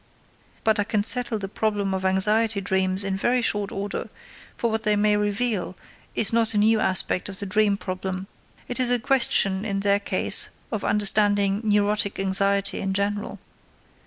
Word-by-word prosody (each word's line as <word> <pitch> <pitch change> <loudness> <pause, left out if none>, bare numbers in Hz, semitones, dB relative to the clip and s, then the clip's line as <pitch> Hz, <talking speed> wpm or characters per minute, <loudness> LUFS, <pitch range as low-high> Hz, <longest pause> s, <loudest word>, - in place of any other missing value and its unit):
But 220 -1 +1
I - - +2
can 210 0 -1
settle 245 0 0
the 195 -2 -5
problem 205 -1 -2
of 190 0 -3
anxiety 210 +3 +3
dreams 190 0 0
in 195 -1 -2
very 240 +5 0
short 205 -3 0
order; 200 +1 -5 0.5
for 235 - -1
what 220 0 -1
they 210 -1 +1
may 210 0 +2
reveal 205 -2 -2 0.4
is 220 0 +2
not 225 -1 +1
a - - +1
new 215 +2 +3
aspect 185 -1 +1
of 195 - -8
the 200 - -4
dream 205 +1 +1
problem; 185 -1 -5 0.4
it 245 - -3
is 250 -1 +3
a 245 - +3
question 220 -6 +1
in 200 -2 -2
their 200 0 +2
case 205 - +2 0.2
of 215 -3 -3
understanding 205 -1 +2
neurotic 205 -1 +1
anxiety 195 +1 +1
in 195 0 -2
general. 205 +2 -2
205 Hz, 170 wpm, -23 LUFS, 195-215 Hz, 0.5 s, anxiety